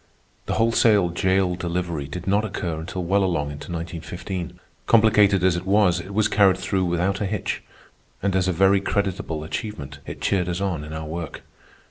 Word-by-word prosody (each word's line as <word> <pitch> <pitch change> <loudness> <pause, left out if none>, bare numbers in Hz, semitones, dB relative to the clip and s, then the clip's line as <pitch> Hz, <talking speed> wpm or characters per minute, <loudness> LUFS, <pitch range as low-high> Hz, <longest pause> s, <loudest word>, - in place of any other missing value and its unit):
The - - 0
wholesale 110 -4 +4
jail 95 +1 +1
delivery 85 -4 -3
did 90 +5 -7
not 100 +2 +2
occur 90 -6 -3
until 90 +3 -5
well 100 +3 +2
along 80 -6 0
into 75 +4 -8
1915. 85 +2 -5 0.3
Complicated 105 -4 +5
as 90 -2 +4
it 90 +2 -4
was, 95 -3 +4
it 95 +3 -8
was 105 +1 +2
carried 100 -3 +4
through 95 0 -1
without 90 +3 0
a 100 - 0
hitch, 105 0 -3 0.6
and 100 -1 +1
as 95 -1 +2
a - - +2
very 95 +3 +4
creditable 95 -6 -2
achievement 70 -5 -6
it - - -7
cheered 90 -2 0
us 90 +1 -2
on 95 -6 -2
in 75 - -8
our 80 0 -5
work. 80 +1 -6
90 Hz, 180 wpm, -23 LUFS, 85-100 Hz, 0.6 s, Complicated